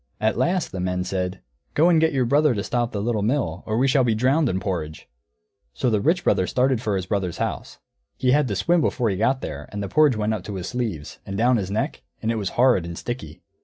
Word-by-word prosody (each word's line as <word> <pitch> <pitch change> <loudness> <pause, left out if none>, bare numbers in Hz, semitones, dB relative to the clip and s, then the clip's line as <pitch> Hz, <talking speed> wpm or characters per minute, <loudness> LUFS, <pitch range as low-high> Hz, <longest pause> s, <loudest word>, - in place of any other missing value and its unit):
At 110 +1 +1
last 180 0 0
the 95 - -5
men 90 0 -1
said, 90 0 -3 0.3
"Go 160 +3 +5
and 165 -3 +4
get 160 0 +3
your 130 -3 +1
brother 145 +1 +3
to 100 - -2
stop 120 +1 -1
the 100 -1 -3
Little 115 -2 0
Mill, 105 - -1
or 110 0 0
we 130 +3 +3
shall 135 0 +3
be 115 -3 +2
drowned 130 +5 +2
in 95 - -1
porridge." 85 -5 -4 0.7
So 125 - 0
the 105 -2 +1
Rich 170 - +2
Brother 95 -3 +2
started 130 -2 +1
for 105 -5 -1
his 95 -2 -2
brother's 95 -4 -2
house. - - -4 0.4
He 130 -1 +2
had 145 0 +3
to 100 - -2
swim 170 - +2
before 120 -7 +1
he - - -1
got 130 +7 +1
there, 75 +1 -6
and 105 -1 -4
the - - -3
porridge 145 +2 +3
went 110 +1 0
up 105 -5 -5
his 95 -4 -5
sleeves, 110 - -4
and 95 - -5
down 120 +3 +3
his 95 -3 -3
neck, 105 +2 -2 0.2
and 110 - -1
it 115 - -1
was 100 -3 -2
horrid 120 -7 +4
and 85 0 -7
sticky. 120 - -6
110 Hz, 245 wpm, -23 LUFS, 95-130 Hz, 0.7 s, Go